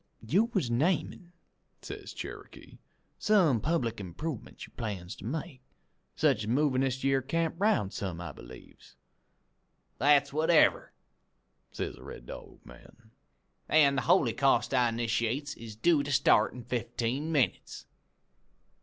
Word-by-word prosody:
"'You 180 - +3
was 195 - -2
namin',' 165 +6 -1 0.5
says - - -8
Cherokee, - - -10 0.4
'some 175 - +3
public 125 -9 -1
improvements 105 - -6
you - - -21
aims 95 -4 -5
to - - -10
make; 145 +1 -5 0.5
sech - - +3
as 105 - -5
movin' 130 +2 +2
this 130 -1 -1
yere 135 0 +2
camp 165 +5 -1
'round 200 - +1
some, 90 -4 -4
I 85 -2 -6
believes?' 65 -2 -14 1.0
"'That's 140 +1 +4
whatever,' 160 +1 +3 0.8
says - - -5
the - - -14
Red - - -10
Dog - - -11
man, 110 - -17 0.6
'an' 145 -3 +5
the 135 - +1
holycaust 135 -6 +2
I 125 -2 +3
'nitiates 120 +5 -1
is 115 -4 -10
due 155 +6 +3
to 145 +1 -4
start 135 - +4
in 125 - -9
fifteen 120 +5 -2
minutes.' 140 -6 -1
135 Hz, 130 wpm, -29 LUFS, 115-155 Hz, 1.0 s, an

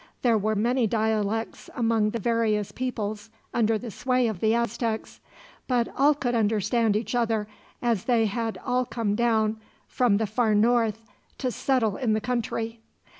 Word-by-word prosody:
There 240 -3 +4
were 215 +1 +1
many 235 +3 +2
dialects 220 0 -1
among 225 -3 +2
the 230 - -3
various 220 -2 0
peoples 215 -4 -4 0.2
under 225 -2 +2
the 235 +1 -7
sway 255 +3 +1
of 220 -6 -2
the 220 +3 +2
Aztecs; 235 -1 -2 0.5
but 245 -2 +1
all 285 +2 +4
could 245 -4 -2
understand 220 0 +2
each 220 +1 -2
other, 225 -3 0 0.4
as 230 -5 +1
they 235 -3 +3
had 225 +2 -2
all 250 0 +1
come 230 -4 -2
down, 220 -1 +1 0.3
from 240 -5 +2
the 220 - 0
far 215 +1 +1
north, 225 0 +2 0.3
to 255 -2 -1
settle 230 -6 0
in 235 -5 +1
the 215 - +2
country. 230 -1 -3
225 Hz, 160 wpm, -26 LUFS, 215-240 Hz, 0.5 s, There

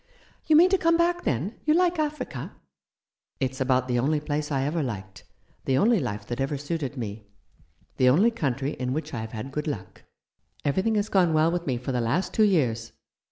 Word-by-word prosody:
" - - -33
You 315 - +5
mean 350 +4 +7
to 385 - +3
come 335 -1 +3
back, 345 +1 +1
then? 150 - -2
You 305 0 +3
like 355 -1 +2
Africa? 300 0 -3 0.4
" - - -56
"It's 130 -1 -2
about 130 -1 +2
the 125 -1 +1
only 150 +5 +1
place 150 0 -3
I 135 -2 +1
ever 155 +4 -1
liked 95 -8 -6 0.2
— - - -37
the 130 - +2
only 225 - +4
life 105 -7 -4
that 120 +4 -4
ever 140 +2 -1
suited 145 -1 -4
me 105 -3 -6 0.3
— - - -35
the 130 - +5
only 195 - +4
country 140 - -2
in 125 -2 -3
which 155 0 -4
I 115 - -3
have 110 0 -7
had 115 +5 -6
good 150 +2 -3
luck. 100 -11 -6 0.6
Everything 190 +10 +1
has 205 0 +1
gone 180 -4 +3
well 155 +2 +4
with 175 -1 -3
me 130 -3 0
for 125 +2 -4
the 125 -1 0
last 125 +11 0
two - - +1
years. 120 - +1
145 Hz, 220 wpm, -26 LUFS, 125-190 Hz, 0.6 s, mean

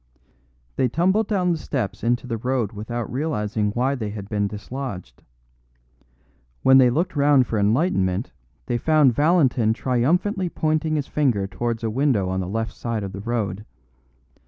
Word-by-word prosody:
They 130 - +3
tumbled 190 - +1
down 185 -4 +1
the 165 - -1
steps 105 -10 -4
into 120 +2 0
the 115 -2 -3
road 125 -3 -1
without 115 +2 -5
realising 110 -7 -1
why 130 +4 +1
they 110 -6 -3
had 100 -1 -7
been 105 -2 0
dislodged; 105 - -7 1.4
when 130 0 +7
they 125 -1 +6
looked 165 +7 -1
round 140 -2 +4
for 110 -2 -2
enlightenment 100 - +1 0.3
they 120 - -1
found 150 -3 +4
Valentin 135 -6 +3
triumphantly 170 - 0
pointing 155 0 0
his 145 -3 -1
finger 125 -12 0
towards 115 +3 -3
a 110 - -1
window 120 -7 +1
on 95 0 -1
the 90 -1 -3
left 115 +2 -3
side 115 -3 -3
of 100 - -5
the 100 +1 -7
road. 105 -4 -2
120 Hz, 160 wpm, -23 LUFS, 105-145 Hz, 1.4 s, when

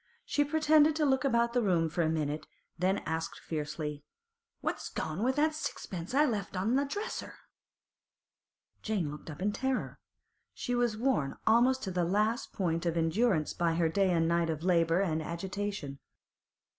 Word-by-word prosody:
She 290 - +2
pretended 305 0 +4
to 310 -1 +2
look 265 -2 +2
about 235 -3 +2
the 245 - +2
room 175 -6 +2
for 160 +2 -1
a 160 - +2
minute, 155 -1 -2 0.3
then 190 +3 0
asked 160 +1 -3
fiercely: 150 -1 -4 0.6
'What's - - -3
gone 160 +4 -3
with 260 +3 +2
that 310 +1 +2
sixpence 190 - -5
I 295 +2 +5
left 205 -7 -2
on 210 +7 +1
the 280 +1 +2
dresser?' 410 +10 -5 1.5
Jane 195 -9 -1
looked 150 +2 -9
up 155 +4 -6
in 205 - +2
terror. 265 +4 -2 0.6
She 245 - -3
was 240 -3 +1
worn 230 - 0
almost 245 +4 +4
to 190 - -3
the 180 -1 0
last 215 +8 0
point 170 -3 -1
of 170 0 0
endurance 165 0 +2
by 170 -1 +1
her 165 -1 +2
day 195 +3 +2
and 165 -2 +2
night 170 0 +2
of 160 0 -3
labour 170 -1 +3
and 160 -5 0
agitation. 175 -3 -4
190 Hz, 170 wpm, -31 LUFS, 165-245 Hz, 1.5 s, I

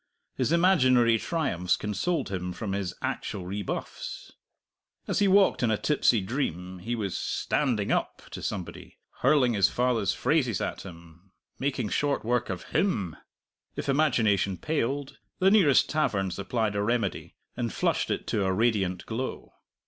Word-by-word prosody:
His - - 0
imaginary 130 -10 +4
triumphs 105 - 0
consoled 130 - -2
him 90 -2 -3
for 105 +4 -6
his 95 -2 -2
actual 95 - -3
rebuffs. 100 +1 -5 0.8
As - - 0
he 205 - +4
walked 195 0 +4
in 120 - +2
a 110 - +2
tipsy 125 -6 +2
dream, 95 - -3
he 115 +6 -3
was 100 -5 -3
"standing 120 -9 0
up" - - -1
to - - -7
somebody, - - -6 0.2
hurling 130 -3 +4
his 100 -4 +4
father's 120 -4 +1
phrases 130 - +1
at - - -3
him, 85 +1 -13 0.3
making 130 -5 -1
short 145 -1 0
work 120 +1 0
of 95 -2 -4
him! 105 - 0 0.6
If - - -4
imagination 120 -10 +2
paled, 145 -2 -2 0.2
the 190 +1 +4
nearest 180 -11 +5
tavern 100 -12 0
supplied 105 +3 -2
a 100 - 0
remedy, 115 -2 -1 0.2
and 120 -2 -2
flushed - - 0
it - - -2
to 105 - +1
a 95 - +1
radiant 95 -4 0
glow. 120 +4 -5
115 Hz, 150 wpm, -27 LUFS, 95-140 Hz, 0.8 s, nearest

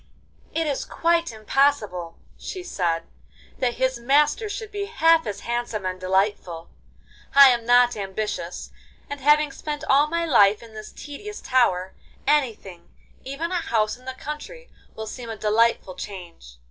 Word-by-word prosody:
'It 330 - +1
is 285 -3 -1
quite 335 -3 0
impossible,' 215 -7 0 0.2
she 370 -2 -7
said, 170 - -1 0.6
'that 245 -2 0
his 260 -1 0
master 295 - +2
should 425 +1 -6
be 405 -1 -3
half 330 - +3
as 205 - -5
handsome 235 -4 -3
and 185 0 -3
delightful. 185 -3 -1 0.6
I 275 -1 +10
am 235 -2 -2
not 245 0 +5
ambitious, 195 -3 -4 0.4
and 285 - -4
having 295 +1 +4
spent 295 +1 -5
all 285 +2 +4
my 335 +2 -1
life 210 -8 +4
in 225 -1 -14
this 215 0 -9
tedious 415 +9 -8
tower, 190 -8 +1 0.3
anything—even 265 - -3
a - - -1
house 215 -7 0
in 250 +1 -19
the 260 0 -5
country—will 300 - -9
seem 235 +2 -8
a 225 - -5
delightful 215 -2 +2
change. 175 - -10
245 Hz, 145 wpm, -24 LUFS, 205-295 Hz, 0.6 s, I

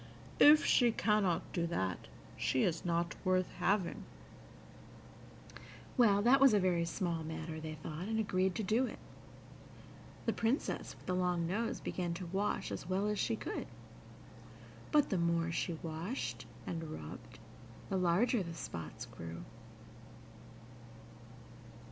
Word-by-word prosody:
If 300 +1 +8
she 240 -2 +5
cannot 210 -5 +2
do 170 -1 0
that, 95 - -2 0.3
she 130 - +1
is 170 -3 0
not 170 -1 0
worth 185 -1 +2
having." 195 -3 0 1.9
Well, 205 -5 +5
that 260 +4 +5
was 270 -5 +7
a - - +5
very 180 -3 +2
small 170 -1 -2
matter, 160 0 -5
they 155 0 -5
thought, 155 +4 -6
and 220 0 -1
agreed 190 -3 +1
to 220 - -2
do 225 +6 +2
it. - - -7 1.3
The - - +1
Princess 235 +7 -1
with - - -17
the 185 - -1
long 180 -2 +1
nose 220 +7 -1
began 175 -2 -3
to 180 +1 -5
wash 195 +4 -1
as 170 - -5
well 190 +2 +1
as 210 -1 -1
she 230 - +1
could, - - -4 1.2
but, 295 -2 +4
the 190 - +2
more 170 -1 +1
she 170 0 -2
washed 165 +10 -4 0.2
and 165 -1 -4
rubbed, 75 - -8 0.5
the 195 - 0
larger 185 +6 +3
the 170 -2 -5
spots 80 - -6
grew. 85 0 -8
180 Hz, 135 wpm, -34 LUFS, 165-210 Hz, 1.9 s, If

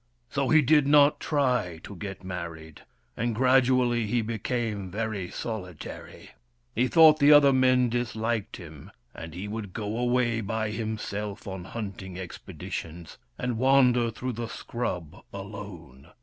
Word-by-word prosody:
So - - 0
he 155 -1 +6
did 145 +1 +4
not 145 0 +5
try 125 - 0
to 100 - -9
get 100 0 -7
married, 85 -4 -7 0.3
and 115 0 -1
gradually 125 -2 +3
he 115 +2 0
became 110 -3 -3
very 100 -2 -3
solitary. 90 -8 -7 0.4
He 125 +3 +2
thought 155 0 +7
the 145 0 +6
other 145 -2 +7
men 130 -1 +4
disliked 115 -2 -2
him, 80 -6 -11 0.2
and 80 0 -9
he 95 +3 -5
would 105 -3 -6
go 110 +1 -3
away 120 -2 +1
by 110 +1 -2
himself 105 -1 -4
on 95 -2 -6
hunting 95 -4 -6
expeditions, 85 -2 -7 0.2
and 125 -3 -2
wander 125 -2 +4
through 125 +3 -4
the 115 +1 -4
scrub 95 -10 -5
alone. 65 +4 -9
115 Hz, 135 wpm, -27 LUFS, 95-125 Hz, 0.4 s, thought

